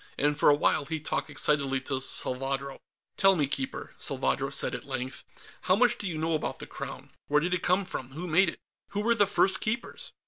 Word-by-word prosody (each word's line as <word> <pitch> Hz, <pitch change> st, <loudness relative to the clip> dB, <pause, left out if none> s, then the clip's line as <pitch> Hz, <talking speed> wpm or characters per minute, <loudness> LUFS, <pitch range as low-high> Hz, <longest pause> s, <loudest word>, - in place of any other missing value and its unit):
And 145 Hz, +1 st, +2 dB
for 150 Hz, -, +5 dB
a 145 Hz, -, +6 dB
while 145 Hz, -, +1 dB
he 160 Hz, +2 st, -3 dB
talked 155 Hz, -, -2 dB
excitedly 140 Hz, -2 st, +1 dB
to 130 Hz, 0 st, -2 dB
Salvadro. 135 Hz, +1 st, -2 dB, 0.4 s
"Tell 195 Hz, -1 st, +6 dB
me, 150 Hz, -4 st, +2 dB
Keeper," 135 Hz, -1 st, -4 dB
Salvadro -, -, -1 dB
said -, -, 0 dB
at -, -, -5 dB
length, 130 Hz, 0 st, -4 dB, 0.4 s
"how 185 Hz, -, +5 dB
much 240 Hz, +2 st, +3 dB
do 205 Hz, -, -3 dB
you 165 Hz, -3 st, -2 dB
know 160 Hz, +1 st, 0 dB
about 155 Hz, -, -2 dB
the -, -, -7 dB
Crown? -, -, -8 dB, 0.2 s
Where 150 Hz, +1 st, +4 dB
did 175 Hz, +4 st, -1 dB
it 180 Hz, -, 0 dB
come 185 Hz, +2 st, +2 dB
from; 130 Hz, -7 st, -4 dB
who 165 Hz, +5 st, -5 dB
made 175 Hz, +2 st, +4 dB
it; -, -, -7 dB, 0.3 s
who 205 Hz, -, -1 dB
were 235 Hz, +2 st, +4 dB
the 205 Hz, -3 st, +3 dB
first 195 Hz, -1 st, +3 dB
Keepers?" 235 Hz, +3 st, -3 dB
155 Hz, 215 wpm, -28 LUFS, 140-190 Hz, 0.4 s, a